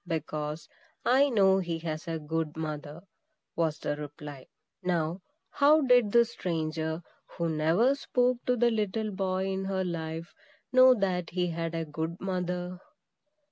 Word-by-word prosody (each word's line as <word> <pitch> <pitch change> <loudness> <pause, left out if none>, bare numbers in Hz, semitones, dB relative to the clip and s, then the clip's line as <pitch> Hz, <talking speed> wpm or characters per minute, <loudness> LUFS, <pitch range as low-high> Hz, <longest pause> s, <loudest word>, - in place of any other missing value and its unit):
"Because 155 -1 -3 0.4
I 270 +3 +5
know 195 -5 +4
he 170 -3 -2
has 160 -1 -5
a 165 -1 -2
good 160 0 -3
mother," 155 +1 -5 0.5
was 160 -2 0
the 145 - -2
reply. 145 -2 -9 0.3
Now, 175 0 -1 0.3
how 300 +2 +5
did 245 -6 +4
this 235 0 +4
stranger, 160 -3 -2 0.3
who 170 - 0
never 165 - +3
spoke 250 -3 +1
to 250 - +3
the 240 0 +4
little 215 0 -1
boy 190 -1 -1
in 190 0 -2
her 190 -1 -1
life, 165 -1 -4 0.4
know 255 0 +8
that 185 -5 -1
he 180 +1 0
had 165 0 -3
a 165 0 -2
good 160 +3 -4
mother? 180 -1 -3
175 Hz, 145 wpm, -29 LUFS, 160-200 Hz, 0.5 s, know